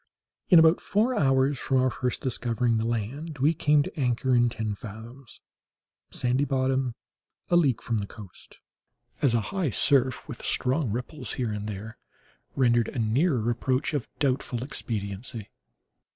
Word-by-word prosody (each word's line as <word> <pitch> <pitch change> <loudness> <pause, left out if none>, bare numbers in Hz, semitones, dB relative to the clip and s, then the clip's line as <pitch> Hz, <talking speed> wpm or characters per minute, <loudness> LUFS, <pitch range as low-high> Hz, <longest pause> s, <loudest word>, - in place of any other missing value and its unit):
In 180 - +8
about 160 +1 +6
four 220 +5 +1
hours 135 -1 +2
from 135 - 0
our 130 0 +3
first 125 0 -2
discovering 120 -2 0
the 110 +1 -1
land 130 +8 -3
we 145 +5 +3
came 150 -1 +3
to - - -8
anchor 125 0 +1
in 120 0 +4
ten 110 -2 -3
fathoms, 115 +5 -11 0.7
sandy 125 +3 +1
bottom, 130 -2 0 0.6
a - - +5
league 140 -9 +3
from 115 -2 -1
the 100 - -4
coast, 100 -5 -13 0.6
as 125 -4 +4
a 115 - +2
high 185 -6 0
surf, 130 +3 +2
with 135 -6 -8
strong 130 +1 0
ripples 125 +3 -4
here 120 -4 -2
and 105 0 -4
there, 105 +3 -7 0.6
rendered 120 -3 +3
a - - -6
nearer 120 +2 +1
approach 130 +5 -1
of 145 -5 -2
doubtful 130 -3 -1
expediency. 105 -3 -5
125 Hz, 150 wpm, -27 LUFS, 115-140 Hz, 0.7 s, In